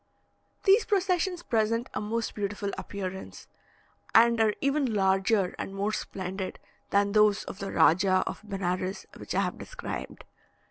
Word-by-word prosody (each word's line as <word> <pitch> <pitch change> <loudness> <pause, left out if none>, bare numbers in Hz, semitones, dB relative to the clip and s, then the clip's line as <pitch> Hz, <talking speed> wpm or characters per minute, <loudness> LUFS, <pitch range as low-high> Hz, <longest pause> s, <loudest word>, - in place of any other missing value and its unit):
These 410 +3 +5
processions 365 -3 0
present 230 +2 +1
a - - -2
most 225 +2 -2
beautiful 205 0 -3
appearance, 190 -1 -6 0.7
and 235 0 +6
are 215 -1 +3
even 275 -4 +1
larger 195 0 +2
and 195 - -5
more 200 +2 0
splendid 190 -1 -4 0.3
than 200 0 +2
those 210 -1 +4
of 195 - -8
the 195 - -4
Rajah 185 +3 +4
of - - -5
Benares, 190 -2 -3
which - - -6
I - - +3
have - - -2
described. - - -7
205 Hz, 140 wpm, -28 LUFS, 190-230 Hz, 0.7 s, and